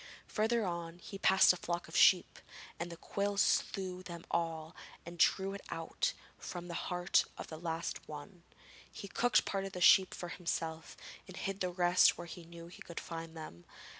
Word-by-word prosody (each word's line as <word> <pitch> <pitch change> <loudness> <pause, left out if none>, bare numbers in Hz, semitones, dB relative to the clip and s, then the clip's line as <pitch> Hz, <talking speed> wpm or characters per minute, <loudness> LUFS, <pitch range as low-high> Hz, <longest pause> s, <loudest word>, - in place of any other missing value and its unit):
Further 225 +1 +1
on, 170 -1 -4
he 195 +2 -9
passed 190 -1 +6
a - - -6
flock 175 0 -3
of - - -10
sheep, 180 -2 +5 0.4
and 170 +1 -4
the 170 - -8
quill 200 +4 -2
slew 185 -2 +1
them 170 -2 -8
all 165 0 -2 0.3
and 170 0 -4
he - - +9
drew 195 +1 -3
it 200 - -7
out 165 - -2 0.3
from 175 -1 -6
the 170 - -6 0.2
heart 180 0 +2
of - - -7
the 160 - -7
last 165 0 -4
one. 155 +5 -9 0.5
He 200 - -8
cooked 245 +4 +2
part 195 -1 -1
of 195 -1 -6
a - - -3
sheep 185 +1 +6
for 175 - -6
himself 165 -2 -4 0.3
and 185 0 -10
hid 195 0 -3
the 185 - 0
rest 175 0 +4
where - - -6
he 170 0 -9
knew 170 0 -11
he 170 - -13
could 170 - -7
find 165 -1 -7
them. 85 - -9
175 Hz, 195 wpm, -34 LUFS, 165-190 Hz, 0.5 s, he